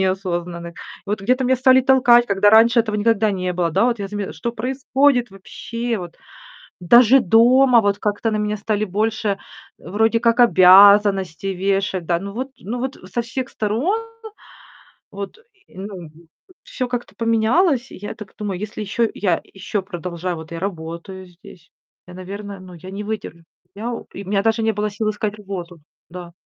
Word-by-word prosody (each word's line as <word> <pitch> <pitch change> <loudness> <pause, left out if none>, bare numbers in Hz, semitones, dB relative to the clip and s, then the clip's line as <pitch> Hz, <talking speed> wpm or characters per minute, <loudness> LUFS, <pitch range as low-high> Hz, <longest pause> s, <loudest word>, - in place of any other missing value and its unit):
неосознанных. 175 -3 -3
И - - -30 0.3
вот 210 +1 -2
где-то 255 +5 +1
меня 260 +1 +2
стали 260 +1 +5
толкать, 250 -2 +5
когда 200 0 +3
раньше 225 +2 +6
этого 215 -2 -2
никогда 220 0 +2
не 185 -2 -2
было, 175 -1 -1
да. 195 +7 +2
Вот 240 -1 +1
я 200 -1 -5
заме 205 -1 -5
"Что 235 - -5
происходит 255 +1 +1
вообще?" 230 +4 -5
Вот. 175 -2 -9 0.6
Даже 240 +8 +6
дома 240 +4 +5
вот 205 -1 0
как-то 210 +2 -1
на - - 0
меня 210 0 -1
стали 215 0 -2
больше, 215 +2 -2 0.5
э, - - -13
вроде 225 +3 +2
как 230 +1 +2
обязанностей 195 -3 +5
вешать, 190 -1 -1
да. 170 0 +1
Ну 200 +3 -7
вот 255 +5 -4
ну 230 +6 -5
вот 265 +1 -4 0.2
со 240 - -1
всех 255 +2 -5
сторон 245 - -1 1.1
вот, 200 - -8 0.3
и, - - -21
ну, 190 -4 -8 0.5
всё 255 - -4
как-то 245 -5 -5
поменялось. 235 - +1
И - - -10
я 205 +3 -7
так 210 -3 -12
думаю: 200 -4 -4
"Если 210 +1 -6
еще 220 +3 0
я 180 -5 0
еще 195 +1 -5
продолжаю 180 -1 -5
вот 160 0 -10
я 165 - -5
работаю 185 +1 -6
здесь, 175 -1 -17 0.4
я, 180 - -12
наверное, 200 +2 -8
ну, 185 -1 -12
я 185 +2 -11
не 200 +2 -6
выдержу." 205 -6 -6 0.3
Я 225 +4 -5 0.2
и 200 - -7
у - - -12
меня 200 0 +1
даже 225 +1 +1
не 220 0 +1
было 210 0 -2
сил 215 +1 -2
искать 210 0 -3
работу, 185 -4 -7 0.3
да. 175 0 -10
205 Hz, 175 wpm, -20 LUFS, 185-230 Hz, 1.1 s, раньше